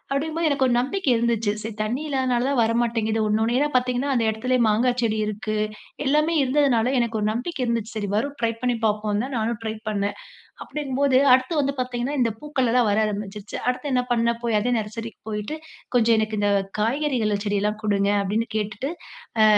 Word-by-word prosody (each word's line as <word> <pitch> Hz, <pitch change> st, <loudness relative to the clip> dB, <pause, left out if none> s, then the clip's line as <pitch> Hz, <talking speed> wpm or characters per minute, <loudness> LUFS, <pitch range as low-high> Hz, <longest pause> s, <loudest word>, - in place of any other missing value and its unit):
அப்டிங்கும்போது, 320 Hz, +4 st, 0 dB
எனக்கு 280 Hz, -2 st, +1 dB
ஒரு 245 Hz, -, +2 dB
நம்பிக்கை 270 Hz, +4 st, 0 dB
இருந்துச்சு. 230 Hz, -2 st, +1 dB
சரி 220 Hz, -1 st, -5 dB
தண்ணி 225 Hz, +6 st, -1 dB
இல்லாதனால 260 Hz, -2 st, +1 dB
தான் 280 Hz, -3 st, 0 dB
வர 225 Hz, 0 st, +3 dB
மாட்டேங்குது. 225 Hz, -2 st, 0 dB
ஒண்ணு 215 Hz, +1 st, +1 dB
ஒண்ணயா 245 Hz, +6 st, +2 dB
பாத்தீங்கன்னா, 250 Hz, +2 st, 0 dB
அந்த 235 Hz, -, +2 dB
எடத்துலயே 250 Hz, +3 st, 0 dB
மாங்கா 235 Hz, +4 st, +3 dB
செடி 220 Hz, -2 st, 0 dB
இருக்கு, 215 Hz, +1 st, -3 dB, 0.5 s
எல்லாமே 300 Hz, +4 st, +2 dB
இருந்ததுனால 260 Hz, -3 st, +2 dB
எனக்கு 235 Hz, -2 st, 0 dB
ஒரு 210 Hz, -, 0 dB
நம்பிக்கை 255 Hz, +6 st, -4 dB
இருந்துச்சு. 230 Hz, -1 st, -2 dB
சரி 205 Hz, -2 st, -2 dB
வரும், 280 Hz, +6 st, -1 dB
ட்ரை 230 Hz, -, +2 dB
பண்ணி 245 Hz, -1 st, +2 dB
பாப்போம்ன்னு 210 Hz, 0 st, +1 dB
தான் 270 Hz, 0 st, -5 dB
நானும் 225 Hz, 0 st, -1 dB
ட்ரை 220 Hz, 0 st, -2 dB
பண்ணேன். 205 Hz, -1 st, -1 dB, 0.5 s
அப்படியிருக்கும்போது, 275 Hz, -2 st, 0 dB, 0.2 s
அடுத்து 260 Hz, +5 st, +2 dB
வந்து 275 Hz, 0 st, -1 dB
பாத்தீங்கன்னா, 250 Hz, +2 st, -2 dB
இந்த 230 Hz, -2 st, +2 dB
பூக்கள் 275 Hz, -5 st, 0 dB
எல்லாம் 245 Hz, -3 st, +4 dB
வர 205 Hz, -, +2 dB
ஆரம்பிச்சுருச்சு. 205 Hz, 0 st, -5 dB
அடுத்து 270 Hz, +3 st, -2 dB
என்னா 250 Hz, -1 st, +2 dB
பண்ணேன்? 235 Hz, 0 st, +1 dB
போய் 230 Hz, -2 st, +2 dB
அதே 245 Hz, +3 st, +1 dB
நர்சரிக்கு 220 Hz, +1 st, -7 dB
போயிட்டு, 210 Hz, +8 st, -4 dB, 0.4 s
"கொஞ்சம் 230 Hz, -1 st, +4 dB
எனக்கு 215 Hz, 0 st, -1 dB
இந்த 205 Hz, 0 st, +2 dB, 0.3 s
காய்கறிகள்ள 230 Hz, -3 st, +1 dB
செடியெல்லாம் 205 Hz, +1 st, 0 dB
குடுங்க" 200 Hz, -1 st, +2 dB
அப்படின்னு 210 Hz, +4 st, -1 dB
கேட்டுட்டு 215 Hz, +7 st, -3 dB, 0.5 s
அ -, -, +7 dB
235 Hz, 180 wpm, -24 LUFS, 215-260 Hz, 0.5 s, அ